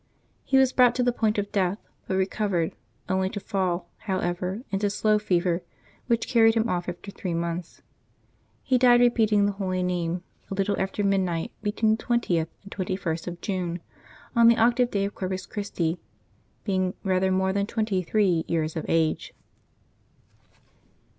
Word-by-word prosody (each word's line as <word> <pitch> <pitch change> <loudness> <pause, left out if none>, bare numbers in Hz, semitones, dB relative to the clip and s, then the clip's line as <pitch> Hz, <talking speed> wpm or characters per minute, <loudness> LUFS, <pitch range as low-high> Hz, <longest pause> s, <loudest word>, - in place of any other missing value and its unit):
He 270 - +2
was 265 -1 +4
brought 250 -2 +5
to 250 - +1
the 245 - +3
point 220 -2 +1
of 205 0 -2
death, 190 -2 +1 0.3
but 190 - -1
recovered, 190 -3 0 0.3
only 190 0 +1
to 205 - -5
fall, 185 -3 -1 0.2
however, 185 +3 -2
into 200 +1 +1
slow 210 +1 +2
fever, 180 -3 +1 0.5
which 235 -2 +1
carried 225 -2 +5
him 225 0 +2
off 180 -3 -2
after 180 +3 -7
three 180 -3 -4
months. 170 0 -4 0.8
He 255 -1 +2
died, 245 -1 +6
repeating 220 -4 +4
the 205 - +2
Holy 185 -2 -2
Name, 175 -1 -1 0.3
a 195 - -3
little 200 +1 +1
after 195 +2 -2
midnight 185 -4 0
between 215 +1 +1
the - - -12
20th 180 -9 +1 0.2
and 200 - -13
21st 180 -4 -3
of 175 -1 -6
June, 180 -3 -2 0.6
on 235 0 +6
the 235 0 +6
octave 240 +2 +3
day 200 -3 0
of 200 - -4
Corpus 185 -1 -4
Christi, 180 -5 -2 0.6
being 185 -2 0
rather 190 0 +1
more 190 0 +1
than 200 0 0
twenty 215 -4 0
three 180 -3 +2
years 160 -1 -1
of 160 - -4
age. 165 -1 0
190 Hz, 160 wpm, -26 LUFS, 180-215 Hz, 0.8 s, died